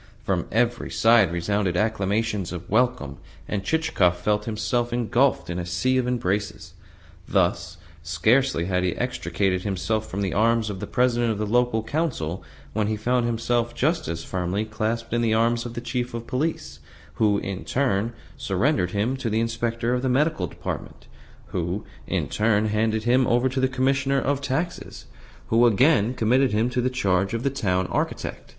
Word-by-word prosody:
From - - -1
every 120 +2 0
side 115 -5 +4
resounded 90 +1 0
acclamations 105 -2 0
of 90 -1 -7
welcome, 120 - +1 0.3
and 100 -2 -2
Chichikov 100 - +1
felt 105 +3 0
himself 120 +2 -1
engulfed 120 +3 +1
in 85 +1 -3
a 90 - -3
sea 90 +10 +1
of 125 - -1
embraces. 105 -4 -2 0.5
Thus, - - 0 0.2
scarcely 85 - +2
had 90 0 0
he 90 -2 0
extricated 95 -6 -1
himself 105 +3 -2
from 100 - -3
the 95 - -1
arms 115 0 +2
of 95 - -6
the - - -5
President 120 -2 +2
of 110 - -2
the 105 - -1
Local 120 0 +1
Council 115 - -2 0.3
when 110 -1 0
he 110 - 0
found 120 +2 +1
himself 120 0 0
just 155 +8 0
as 85 0 -4
firmly 95 +3 -2
clasped 110 +1 -3
in 120 - +2
the 110 -1 +2
arms 115 +1 +1
of 120 - -9
the 120 - -4
Chief 120 0 -3
of 115 0 -5
Police, 125 - -3 0.4
who, 105 -2 +4
in 100 -1 -4
turn, 120 -4 0 0.2
surrendered 90 - 0
him 105 +7 0
to 130 -3 -2
the 110 +1 +1
Inspector 115 +1 -1
of 125 - 0
the 130 - 0
Medical 135 - +1
Department, - - -7 0.4
who, 90 +4 -3 0.2
in - - -1
turn, 105 0 +1
handed 110 +1 0
him 125 +2 +3
over 120 +2 +3
to 130 +1 -2
the 130 - +3
Commissioner 135 +1 +1
of 140 +1 -1
Taxes, 150 +6 -3 0.4
who, 115 +2 +5
again, 120 0 +3
committed 125 +2 +2
him 115 +4 +1
to 125 - 0
the 130 - +1
charge 100 -5 0
of 115 - -3
the 140 - +1
Town 95 -9 0
Architect. - - -3
115 Hz, 175 wpm, -24 LUFS, 100-125 Hz, 0.5 s, who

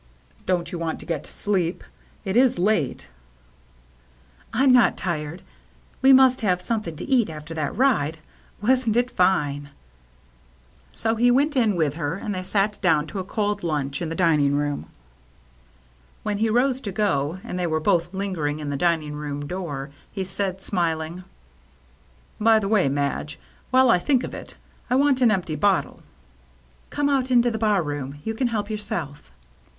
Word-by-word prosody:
" - - -31
Don't 180 -2 0
you 175 - -4
want 165 -1 -3
to - - -10
get 160 -4 -3
to - - -12
sleep? 185 -4 -1 0.4
It 190 +1 -2
is 250 -3 +4
late." 175 - 0 0.7
" - - -32
I'm 260 +3 +4
not 245 -3 +5
tired. 160 -1 -4 0.6
We 265 +1 +6
must 260 -1 +6
have 185 -4 +1
something 180 -3 -3
to - - -7
eat 255 -7 +3
after 155 +1 -8
that 155 -2 -3
ride. 200 - +2 0.4
Wasn't 240 0 +2
it 245 +1 +1
fine? 145 - +1 0.7
" 60 0 -32
So 225 0 +2
he 240 +2 +3
went 285 +5 +2
in 225 -6 +3
with 155 -5 +1
her, 165 0 -2
and 205 +2 -4
they 185 - -3
sat 200 +2 -1
down 160 -5 +3
to 195 - -3
a - - -2
cold 205 +1 -2
lunch 145 -4 -2
in 165 - -2
tHe 165 - -4
dining 150 -6 +3
room. 145 0 -2 1.4
When 210 -1 -2
he 225 +1 +2
rose 255 +3 +2
to 205 - -5
go, 185 -6 0
and 180 - -5
they 175 - 0
were 160 -1 0
both 170 +2 +1
lingering 185 -7 -2
in 150 -2 -4
the 140 - -2
dining 160 -2 0
room 145 -1 -5
door, 150 -5 -5 0.2
he 195 - -3
said, 190 0 -3
smiling, 170 -1 -2 0.6
" 60 - -27
By 225 +1 +6
the 205 -2 -1
way, 200 -8 +3
Madge, 145 +3 -2 0.3
while 260 -1 +5
I 180 - +4
think 255 +5 +1
of - - -6
it, - - -9 0.3
I 250 - +2
want 275 -1 +3
an 245 - +6
empty 185 -6 -1
bottle." 195 +5 +1 0.9
"Come 290 -1 0
out 270 -2 +1
into 240 -1 +4
the 220 - -3
bar 210 -4 +2
room. 145 -2 -5
You 225 - -2
can 245 +3 0
help 215 -3 -2
yourself." 170 - -5
180 Hz, 180 wpm, -24 LUFS, 150-220 Hz, 1.4 s, We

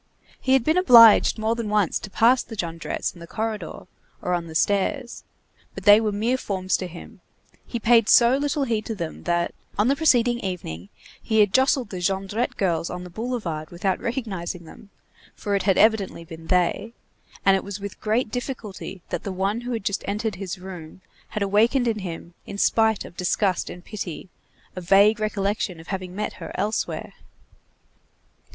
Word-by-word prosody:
He 260 - +2
had 265 -3 +4
been 315 +6 +3
obliged 235 - +7
more 220 +1 0
than 230 -2 -4
once 210 -5 +1
to - - -8
pass 240 +5 +4
the 225 - -9
Jondrettes 165 -4 -3
in 175 - -15
the 170 - -10
corridor 215 -4 -4 0.3
or 180 - -2
on 170 -1 -2
the 160 - -10
stairs; 240 - 0 0.5
but - - -7
they 205 +1 +8
were 215 -2 0
mere 230 +6 0
forms 190 -4 -1
to 185 - -5
him; 170 0 -12 0.5
he - - -9
had 230 - -3
paid 230 -2 +5
so 240 +1 +6
little 285 +1 0
heed 225 -4 -1
to 225 - -3
them, 170 -5 -6
that, 175 0 0 0.2
on 210 +5 +3
the 275 - +3
preceding 245 -6 +3
evening, 135 - -5 0.3
he 220 -1 +1
had 205 -2 +2
jostled 260 -3 +2
the 185 - -5
Jondrette 195 +5 -1
girls 170 -4 0
on 180 0 -6
the 180 - -10
boulevard, 190 -8 -4
without 180 +2 -1
recognizing 195 -8 -4
them, 200 +6 -14 0.5
for 205 - -3
it 200 - +2
had 195 -1 +2
evidently 210 -5 +2
been 165 -1 -11
they, 180 +5 +1 0.5
and 195 - +6
it 190 - -1
was 200 0 -6
with 200 -1 -8
great 220 +1 0
difficulty 220 -8 -6
that - - -3
the 200 - -5
one 195 +5 -1
who 245 +1 -5
had 230 -4 -3
just 200 - -1
entered 210 +2 -2
his 190 -2 -5
room 180 -2 -10 0.3
had 215 - -3
awakened 225 +6 +2
in 220 -2 0
him, 170 -2 -7
in 200 - -6
spite 220 0 +2
of - - -12
disgust 185 +1 0
and 175 0 -10
pity, 190 -4 -6 0.5
a 185 - -5
vague 200 +5 +5
recollection 200 -3 -2
of 165 - -13
having 185 -2 -5
met 210 +1 -3
her - - -6
elsewhere. 210 +2 -2
205 Hz, 185 wpm, -24 LUFS, 180-230 Hz, 0.5 s, they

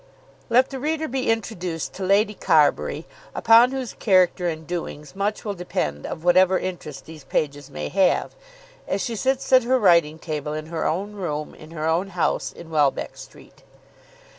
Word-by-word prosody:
Let 255 +3 +4
the 265 - -5
reader 315 +3 -1
be 260 -2 -2
introduced 185 -7 -2
to 190 - -6
Lady 205 +3 +3
Carbury, 155 -6 +2 0.3
upon 230 +2 +6
whose 265 -3 -4
character 185 -3 +2
and 160 -1 -4
doings 155 -2 -6
much 205 +3 -2
will 205 - -2
depend 75 - -3
of 160 - -6
whatever 185 +1 +5
interest 155 -7 -6
these 155 -2 -11
pages 145 +1 -2
may 75 -1 -5
have, 190 -2 +2 0.5
as 195 -1 -1
she 230 - -3
sits 265 +3 -1
at 255 - +8
her 255 +2 +2
writing 170 -8 +4
table 150 -2 -4
in 155 0 -4
her 160 - -1
own 195 +6 -2
room 155 -7 -4
in 155 - -13
her 155 -1 -5
own 170 +4 +1
house 175 -4 -1
in 165 -1 -12
Welbeck 145 -3 +1
Street. - - -14
180 Hz, 170 wpm, -23 LUFS, 155-215 Hz, 0.5 s, at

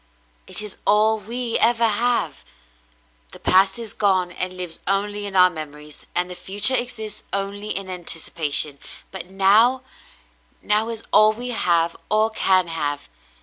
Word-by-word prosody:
It 215 - -2
is 210 - -7
all 215 +1 +3
we 235 +3 -4
ever 230 0 +3
have. 235 +3 0 0.9
The - - -11
past 190 +2 +3
is 230 -3 -6
gone, 185 -3 0
and 185 +1 -4
lives 180 -2 -4
only 205 +1 -1
in 195 - -7
our 185 -1 +5
memories, 150 -2 -9
and 180 0 +1
the 180 - -7
future 200 +7 +4
exists 220 -4 -2
only 200 +1 -4
in 195 -2 -3
anticipation; 160 -5 0 0.3
but 185 -2 -8
now 215 +7 +3 0.4
— - - -37
now 215 +2 +2
is 225 -1 -6
all 215 +1 +5
we 245 +3 -7
have 170 -7 +1
or 215 +1 +2
can 185 -4 +2
have. 145 -3 -3
195 Hz, 150 wpm, -21 LUFS, 180-220 Hz, 0.9 s, our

